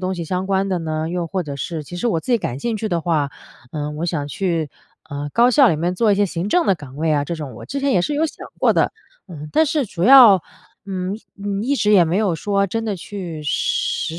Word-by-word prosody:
东 185 0 -2
西 170 - -4
相 180 +3 -2
关 195 0 0
的 185 -2 -1
呢？ 155 0 -3
又 175 -1 -3
或 185 0 -2
者 145 -2 -6
是 155 +2 -5
其 175 - -8
实 240 +7 -1
我 190 - +1
自 245 - -3
己 - - +5
感 125 - -4
兴 225 +9 -2
趣 215 +1 -3
的 170 -4 0
话， 155 -4 0 0.4
呃， 150 -1 -4
我 150 +3 -4
想 160 -4 -2
去， 165 -1 -2 0.4
呃， 145 0 -5
高 240 +1 +5
校 260 +1 +5
里 160 - +1
面 175 +3 -1
做 215 +3 +2
一 200 - +3
些 205 0 +2
行 175 +1 -3
政 350 +7 +2
的 195 - +4
岗 145 -5 -12
位 155 +1 0
啊， 145 -1 +2
这 170 +3 -4
种。 145 -6 -7
我 - - -10
之 280 - -4
前 275 0 +1
也 180 - +3
是 295 - -1
有 310 +3 +1
想 - - -10
过 - - +4
的。 - - +1 0.6
但 315 - +4
是 300 -4 0
主 170 -3 -6
要， 230 -5 +8 0.4
嗯 190 0 -3 0.3
嗯， 200 0 -2
一 270 +5 +1
直 210 -4 +2
也 185 -4 +6
没 170 +4 0
有 200 -6 +1
说 200 +4 0
真 225 +4 -3
的 210 - -1
去 175 -4 -7
实 160 +2 -1
180 Hz, 275 characters per minute, -20 LUFS, 160-210 Hz, 0.6 s, 要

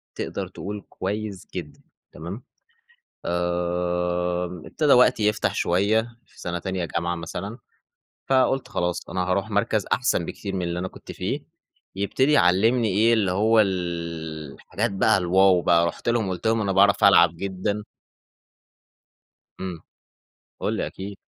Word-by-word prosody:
تقدر - - -4
تقول 105 0 -7
كويس 100 0 -4
جدًا، 80 -5 -7 0.3
تمام؟ 90 +9 -8 0.8
امم، 90 0 -1
ابتدى 150 -3 +2
وقتي 125 -4 +5
يفتح 105 - 0
شوية 100 +5 +2 0.2
في - - -22
سنة 85 0 -3
تانية 95 0 -3
جامعة 85 +1 -2
مثلًا، 90 +6 -6 0.7
فقلت 135 0 +2
خلاص 90 0 -2
أنا 95 - -2
هاروح 95 +2 -1
مَركَز - - 0
أحسن - - +1
بكتير 100 - -6
من 95 - -2
اللي 85 0 -2
أنا 95 +1 -3
كنت - - -11
فيه، - - -3 0.6
يبتدي 130 +8 +1
يعلّمني 110 +1 +4
إيه 110 +4 +3
اللي 100 -5 +1
هو 110 +4 +4
ال 85 -5 -3
الحاجات 105 +5 -3
بقى 100 +2 +3
الواو 95 0 +4
بقى. 85 0 +4
رُحت 85 - -4
لهُم 115 -4 +1
وقلت 90 +2 -4
لهُم: 115 0 +2
"أنا 100 -2 0
باعرِف 100 +1 +4
ألعب 85 -4 +6
جدًا." 100 +3 -3 1.8
امم. 90 -3 -5 0.8
قل - - -1
لي - - -1
أكيد. 100 +1 -8
95 Hz, 140 wpm, -24 LUFS, 85-105 Hz, 1.8 s, ألعب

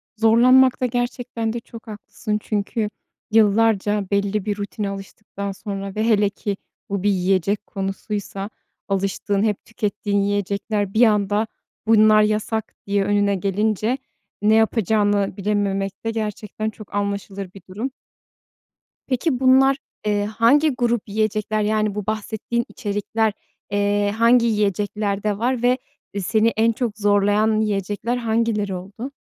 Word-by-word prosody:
Zorlanmakta 250 +3 +5
gerçekten 245 -2 -2
de 235 - -3
çok 230 0 -13
haklısın. 210 0 -4
Çünkü 210 +1 -2 0.4
yıllarca 210 -1 +3
belli 200 0 0
bir 205 -1 -1
rutine 205 0 -3
alıştıktan 200 0 -6
sonra 195 -1 -6
ve 215 - 0
hele 210 -3 +3
ki 200 -1 -4 0.3
bu 200 -1 -2
bir 205 - +3
yiyecek 195 +2 +1
konusuysa, 195 0 -4 0.4
alıştığın 195 +1 0
hep 210 -3 -1
tükettiğin 205 -2 -2
yiyecekler 205 0 -1
bir 235 +2 +6
anda, 210 0 +2 0.4
bunlar 215 -1 +6
yasak 215 +1 -1
diye 200 0 +2
önüne 205 0 +2
gelince, 210 +5 0 0.4
ne 215 +1 +4
yapacağını 205 -3 +2
bilememek 200 0 -1
de 225 - 0
gerçekten 215 0 -3
çok 215 -1 -11
anlaşılır 200 -1 -3
bir 195 - -12
durum. 225 +8 -4 1.2
Peki 260 0 0
bunlar, 265 +1 +5 0.3
eee, 205 -1 +1
hangi 230 +8 +4
grup 240 -4 0
yiyecekler, 215 0 0
yani, 215 -1 +1
bu 210 -2 -3
bahsettiğin 220 +2 -2
içerikler, 210 +1 -1 0.4
eee, 205 0 +1
hangi 235 +1 +5
yiyeceklerde 205 -1 0
var 245 +2 0
ve, 250 +1 +4 0.4
eee, 200 - -2
seni 220 +4 +2
en 230 +1 +4
çok 225 -2 -3
zorlayan 205 +1 +3
yiyecekler 210 +3 -1
hangileri 220 -4 0
oldu? 205 +9 -7
210 Hz, 125 wpm, -22 LUFS, 200-225 Hz, 1.2 s, bir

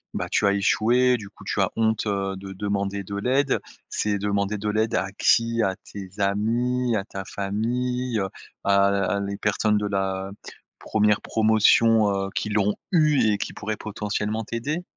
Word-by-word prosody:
bah - - -1
tu 105 - +2
as 100 - +3
échoué, 120 +5 +3
du 105 -3 -9
coup, - - -16
tu - - 0
as - - +2
honte, 110 -1 +1
heu, 100 -1 -1
de 95 0 -8
demander 100 0 -2
de 100 - -8
l'aide, 130 +6 +1 0.3
c'est 105 -1 0
demander 100 +1 -1
de 105 +1 -4
l'aide 110 +1 0
à 95 +1 -1
qui? 115 0 +3
À 95 -2 0 0.2
tes 95 -2 -7
amis, 115 +5 +1
à 95 - -2
ta 95 -2 -7
famille, 120 +5 -2
heu, 95 - 0 0.4
à 100 0 +4
à 100 0 +1
les 100 0 -3
personnes 105 +1 +1
de 105 - -1
la 95 -1 -2 0.5
1re 105 -1 +2
promotion, 110 0 +4
heu, 95 0 -1
qui 105 - -1
l'ont 105 0 +1 0.2
eu 150 - +4
et - - 0
qui - - -4
pourraient 110 0 -4
potentiellement 105 +1 -3
t'aider? 140 +11 -3
105 Hz, 175 wpm, -24 LUFS, 100-115 Hz, 0.5 s, à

